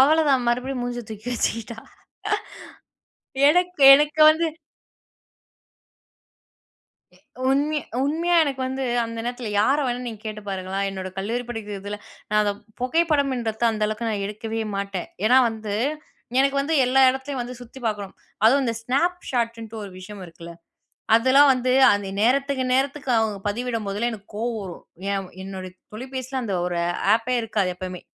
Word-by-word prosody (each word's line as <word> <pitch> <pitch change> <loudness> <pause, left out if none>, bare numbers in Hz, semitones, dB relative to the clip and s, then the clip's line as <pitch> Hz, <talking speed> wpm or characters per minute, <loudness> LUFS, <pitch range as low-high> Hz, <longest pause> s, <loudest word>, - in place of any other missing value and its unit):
அவ்வள 305 +4 +5
தான் 260 -3 +2
மறுபடியும் 250 +1 -1
மூஞ்ச 245 0 -3
தூக்கி 220 +2 -8
வச்சுக்கிட்டா 230 -1 -2 1.7
எனக்கு 355 -1 +2
எனக்கு 300 +2 +1
வந்து 325 +2 +1 2.7
எ - - -24 0.3
உண்மைய 295 +3 +1 0.3
உண்மையா, 335 +4 0
எனக்கு 275 -3 -3
வந்து 265 +1 -3 0.2
அந்த 230 0 -6
நேரத்ல 245 -1 -4
யார 265 +7 +3
வேணா 245 0 -2
நீங்க 220 -3 -7
கேட்டு 215 -1 -6
பாருங்களேன், 190 0 -3
என்னோட 190 -1 -5
கல்லூரி 225 +6 -2
படிக்கிறதில 210 -3 -5 0.3
நான் 210 0 +3
அத 205 - +1 0.3
புகைப்படம்ன்றது 260 -6 +1
அந்த 215 -1 -1
அளவுக்கு 215 +2 -3
நான் 210 -2 -2
எடுக்கவே 220 +2 -4 0.2
மாட்டேன். 200 -2 -4 0.2
ஏன்னா 250 +4 +6
வந்து 220 -2 -5 0.6
எனக்கு 275 +1 +3
வந்து 300 +4 -1
எல்லா 255 +2 +3
இடத்துலயும் 265 0 -4
வந்து 245 +1 -7
சுத்தி 245 +2 -12
பாக்கணும். 205 -3 -3 0.3
அதுவும் 270 +5 +5
இந்த 230 -2 -1
Snapchatன்ட்டு 240 -6 -1
ஒரு 200 - -8
விஷயம் 195 +2 -10
இருக்குல, 170 0 -11 0.6
அதெல்லாம் 260 +5 +6
வந்து 255 0 0 0.2
அந்த 205 -1 -1
நேரத்துக்கு 270 +2 +2
நேரத்துக்கு 275 0 0
அவங்க 220 -2 0
பதிவிடும் 230 0 -3
போதெல்லாம் 220 +5 -1
எனக்கு 205 -2 -10
கோவம் 230 +1 -2
வரும். 180 -3 -9 0.3
ஏன் 195 -2 -3
என்னுடைய 190 -1 -7 0.2
தொலைபேசில 260 +2 -5
அந்த 205 -5 -2
ஒரு 175 -1 -2 0.4
ஆப்பே 235 +3 0
இருக்காது 205 -5 -1
எப்பவுமே. 185 -1 -6
235 Hz, 140 wpm, -23 LUFS, 210-265 Hz, 2.7 s, ஏன்னா